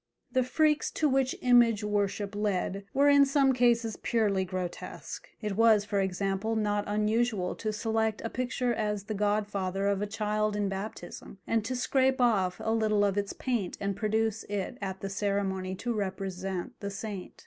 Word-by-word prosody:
The 260 - +3
freaks 305 +4 +2
to 310 - +2
which 265 -1 +1
image 240 -4 +5
worship 205 -1 -1
led 200 -1 -1
were 280 +2 +3
in 285 0 +7
some 275 -1 +3
cases 235 -3 +2
purely 205 -5 +1
grotesque; 185 -1 -6
it 210 -2 -2
was, 220 -1 +5
for 200 -1 0
example, 195 +3 -1
not 210 -1 0
unusual 210 -2 +1
to 215 - -2
select 220 0 0
a - - -1
picture 250 0 -1
as 210 -3 -2
the 215 - -4
godfather 200 -2 -1
of 200 -1 +1
a 210 - -1
child 215 0 -1
in 205 -1 0
baptism, 195 -1 -7
and 225 -1 +1
to 255 - -2
scrape 260 +1 +2
off 200 -7 +2
a 220 - +1
little 215 -2 +2
of 200 -1 +1
its 205 -1 -1
paint 235 -8 -2
and 200 -1 -2
produce 220 +1 0
it 200 -2 -4
at 190 -1 -4
the 195 - -3
ceremony 195 -2 -1
to 235 +5 -2
represent 190 -2 -4
the 200 - -4
saint. 200 -1 -6
210 Hz, 170 wpm, -29 LUFS, 195-230 Hz, -, in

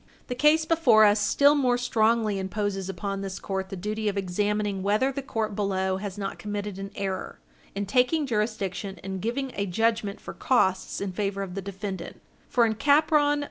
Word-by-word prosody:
The - - -1
case 300 +5 +4
before 315 -10 +5
us 205 +1 +4
still 285 +7 +4
more 255 -4 +2
strongly 225 -3 +1
imposes 195 0 -2
upon 195 +2 -4
this 195 -1 -5
court 190 -1 -4
the - - -5
duty 210 +3 -2
of 200 - -4
examining 205 +1 -1
whether 210 +7 +2
the 275 - -4
court 220 -6 -3
below 190 -2 0
has 200 0 -6
not 195 -1 -4
committed 205 -1 -4
an 195 0 -5
error 195 -2 -4 0.4
in 200 0 -2
taking 255 - +2
jurisdiction 210 -4 -2
and 190 -1 -5
giving 260 +5 -2
a 200 0 -2
judgment 220 +1 0
for - - -8
costs 190 -8 +1
in 200 -1 -2
favor 195 +1 -2
of 185 -2 -7
the 195 - -4
defendant, 195 -2 -6 0.3
for 240 -2 +4
in 220 - +1
Capron 290 +4 +3
v. - - -2
205 Hz, 185 wpm, -26 LUFS, 195-235 Hz, 0.4 s, before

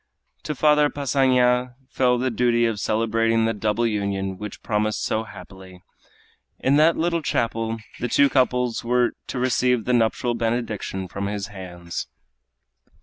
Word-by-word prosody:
To 150 - -3
Father 150 +1 +4
Passanha 125 -3 +2
fell 125 -2 +2
the 130 +1 -1
duty 120 0 +2
of 115 -3 -1
celebrating 115 +1 +1
the 115 - +1
double 105 +2 0
union 100 -3 -2
which 105 0 -8
promised 105 -1 -1
so 110 +1 -1
happily. 95 -2 -13 0.7
In 140 +2 +2
that 160 +2 +4
little 170 0 0
chapel 115 -4 -1 0.2
the 120 - -1
two 140 +4 +4
couples 125 -3 +1
were 120 0 +2 0.2
to - - -5
receive 125 -2 +1
the 125 - +1
nuptial 120 +1 +1
benediction 115 -5 -2
from 100 +3 -4
his 100 -1 -4
hands. 90 -3 -7
115 Hz, 145 wpm, -23 LUFS, 105-125 Hz, 0.7 s, Father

